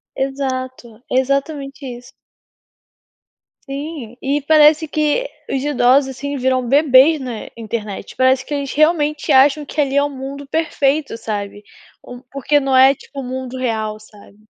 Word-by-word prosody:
Exato, 260 Hz, -4 st, -4 dB
exatamente 275 Hz, +2 st, -1 dB
isso. 245 Hz, 0 st, -9 dB, 1.5 s
Sim, 275 Hz, -4 st, -7 dB
e 280 Hz, +2 st, 0 dB
parece 310 Hz, +1 st, +5 dB
que 305 Hz, +12 st, 0 dB, 0.2 s
os 270 Hz, -1 st, -2 dB
idosos, 270 Hz, -1 st, +3 dB
assim, 280 Hz, +2 st, -5 dB
viram 255 Hz, -1 st, 0 dB
bebês 285 Hz, +2 st, +5 dB
na 245 Hz, -4 st, -6 dB
internet. 215 Hz, -3 st, -6 dB
Parece 260 Hz, 0 st, +3 dB
que 295 Hz, -, -4 dB
a -, -, 0 dB
gente 280 Hz, -1 st, -5 dB
realmente 305 Hz, -1 st, +2 dB
acha 275 Hz, +2 st, +5 dB
que -, -, -6 dB
ali 280 Hz, -1 st, +1 dB
é 285 Hz, -, +4 dB
um 290 Hz, -, -1 dB
mundo 275 Hz, +1 st, -8 dB
perfeito, 295 Hz, -3 st, 0 dB
sabe, 205 Hz, -2 st, -5 dB, 0.4 s
hum, 245 Hz, 0 st, -11 dB
porque 280 Hz, +2 st, +1 dB
não 270 Hz, -1 st, 0 dB
é 265 Hz, +1 st, +6 dB
tipo 280 Hz, -, -11 dB
o -, -, -5 dB
mundo 260 Hz, 0 st, -5 dB
real, 220 Hz, -3 st, -2 dB
sabe. 210 Hz, -1 st, -18 dB
270 Hz, 150 wpm, -18 LUFS, 250-290 Hz, 1.5 s, é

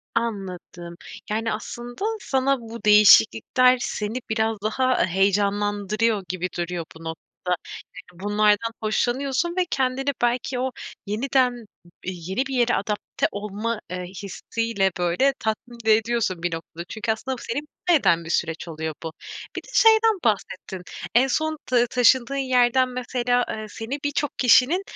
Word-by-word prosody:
Anladım. 185 Hz, -5 st, -4 dB, 0.3 s
Yani 225 Hz, +2 st, -1 dB
aslında 240 Hz, -, -6 dB, 0.2 s
sana 270 Hz, -2 st, +1 dB
bu 230 Hz, 0 st, -9 dB
değişiklikler 210 Hz, -, +6 dB
seni 215 Hz, +4 st, -3 dB
biraz 220 Hz, 0 st, 0 dB
daha 255 Hz, +4 st, +2 dB
heyecanlandırıyor 205 Hz, +3 st, +1 dB
gibi 180 Hz, 0 st, -2 dB
duruyor 175 Hz, -1 st, -3 dB
bu 160 Hz, -, -12 dB
noktada. 165 Hz, +2 st, -4 dB, 0.6 s
Yani 175 Hz, -1 st, -18 dB
bunlardan 210 Hz, +2 st, +2 dB
hoşlanıyorsun 265 Hz, +9 st, 0 dB
ve 365 Hz, -, +2 dB
kendini, 270 Hz, +1 st, 0 dB
belki, 245 Hz, +2 st, 0 dB
o 260 Hz, +1 st, -1 dB, 0.4 s
yeniden 245 Hz, +2 st, 0 dB, 0.4 s
yeni 185 Hz, +7 st, -3 dB
bir 270 Hz, -, -4 dB
yere 240 Hz, -1 st, +3 dB
adapte 205 Hz, +1 st, -1 dB
olma, 210 Hz, +2 st, -3 dB
eee, 180 Hz, 0 st, -4 dB, 0.2 s
hissi 200 Hz, +3 st, -4 dB
ile 195 Hz, -4 st, +2 dB
böyle 180 Hz, +11 st, +2 dB
tatmin 230 Hz, +2 st, -4 dB
de 220 Hz, -1 st, +7 dB
ediyorsun 220 Hz, -6 st, -1 dB
bir 175 Hz, -1 st, -1 dB
noktada. 165 Hz, +1 st, -8 dB
Çünkü 220 Hz, 0 st, -1 dB
aslında 260 Hz, +4 st, -4 dB
bu -, -, -10 dB
seni 250 Hz, +5 st, -2 dB
mutlu 300 Hz, -, +1 dB
bir 160 Hz, -, -8 dB
süreç 165 Hz, 0 st, -1 dB
oluyor, 160 Hz, -1 st, -4 dB
bu. 160 Hz, -1 st, -5 dB, 0.4 s
Bir -, -, -4 dB
de -, -, -19 dB
şeyden 445 Hz, -2 st, +5 dB
bahsettin. 195 Hz, -4 st, -2 dB, 0.3 s
En 245 Hz, +3 st, +5 dB
son 315 Hz, +3 st, -1 dB
ta 245 Hz, -1 st, +3 dB
taşındığın 250 Hz, +2 st, +3 dB
yerden, 255 Hz, -1 st, +3 dB
mesela, 245 Hz, 0 st, 0 dB
eee, 215 Hz, 0 st, -5 dB
seni 225 Hz, +7 st, -5 dB
birçok 290 Hz, 0 st, -2 dB
kişinin, 260 Hz, +8 st, +5 dB
225 Hz, 140 wpm, -24 LUFS, 195-255 Hz, 0.6 s, de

